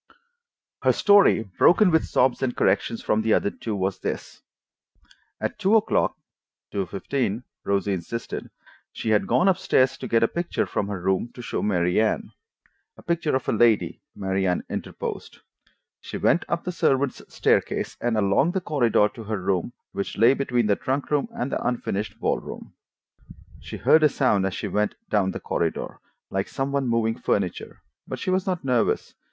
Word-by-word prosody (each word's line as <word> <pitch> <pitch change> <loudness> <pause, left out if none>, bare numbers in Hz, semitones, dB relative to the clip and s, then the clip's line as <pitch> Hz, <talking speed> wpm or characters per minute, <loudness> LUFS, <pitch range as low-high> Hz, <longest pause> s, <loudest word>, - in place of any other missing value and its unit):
Her - - +4
story, 200 - +5 0.2
broken 185 +1 +6
with 160 - +3
sobs 130 0 +2
and 130 -2 -1
corrections 115 - +1
from 105 - +1
the 110 0 +3
other 100 - 0
two, 110 -2 -5
was 95 0 -2
this: - - -5 1.0
At - - -3
two 200 +4 +3
o'clock 220 - +2 0.5
(two 100 -2 -2
fifteen, 115 +4 -2 0.2
Rosie 100 0 0
insisted) 95 +6 -5 0.4
she 110 - -3
had 105 - +2
gone 180 - +3
up 190 -1 +3
stairs 130 -7 +2
to - - -5
get 115 0 +3
a - - +5
picture 170 +6 -2
from 100 - -2
her 100 -2 -4
room 95 +5 0
to 125 - -8
show - - -3
Mary 90 -1 +2
Anne. 210 - -1 0.7
(A - - -15
picture 170 -4 0
of 130 - -2
a - - +2
lady, 115 -1 +2
Mary 95 0 -1
Anne 90 - 0
interposed.) - - -5 0.6
She - - -7
went 175 - +2
up 170 - -1
the 180 - -3
servants' 140 -5 +1
staircase - - 0
and 120 -2 0
along 105 - +2
the 190 - +1
corridor 120 -10 +2
to 115 - -10
her 105 -1 -2
room, 95 +3 -1 0.2
which 100 - -4
lay 115 +5 +6
between 125 -4 0
the 105 -1 +3
trunk 135 +6 -3
room 150 +7 +1
and 230 -11 -4
the - - -2
unfinished 110 -4 -2
ball - - 0
room. - - -10 0.9
She - - -8
heard 160 - +5
a 150 - +6
sound 105 -9 +2
as 95 - -4
she - - -3
went 105 0 0 0.2
down 100 -3 +2
the - - -4
corridor, - - -2 0.3
like 95 0 -1
some 135 +1 -3
one 140 -2 0
moving 115 -1 0
furniture, 95 -3 -2 0.2
but - - -4
she 185 - -2
was 185 0 0
not 180 -4 -1
nervous. 125 -3 +1
115 Hz, 180 wpm, -24 LUFS, 100-140 Hz, 1.0 s, broken